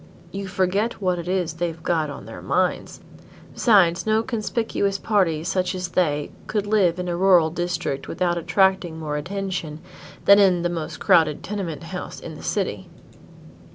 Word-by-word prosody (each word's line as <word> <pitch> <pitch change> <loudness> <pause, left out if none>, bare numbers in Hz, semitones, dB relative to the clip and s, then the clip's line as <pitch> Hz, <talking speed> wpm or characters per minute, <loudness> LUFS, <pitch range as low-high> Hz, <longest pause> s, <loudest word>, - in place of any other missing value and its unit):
"You 195 +1 -5
forget 195 +4 0
what 180 -3 0
it 170 - -7
is 180 -3 -1
they've 165 -1 -4
got 160 -3 0
on 140 - -8
their - - -9
minds; - - -1 0.5
besides 190 -7 +4
no 220 +1 +2
conspicuous 220 -3 -1
party 185 -8 +1
such 185 +1 -1
as 180 -1 -4
they 150 -5 0 0.2
could 210 -2 -1
live 200 -5 +2
in 180 0 -4
a 175 - -1
rural 175 -3 +4
district 175 -5 -3
without 175 -1 0
attracting 190 -1 +1
more 155 -2 -4
attention 180 -2 -4 0.5
than 200 +1 +8
in 185 -3 +4
the 175 - +1
most 165 -3 -5
crowded 155 -3 +3
tenement 190 -8 -4
house - - -7
in - - -8
the - - -10
city." - - -2
180 Hz, 160 wpm, -23 LUFS, 165-195 Hz, 0.5 s, than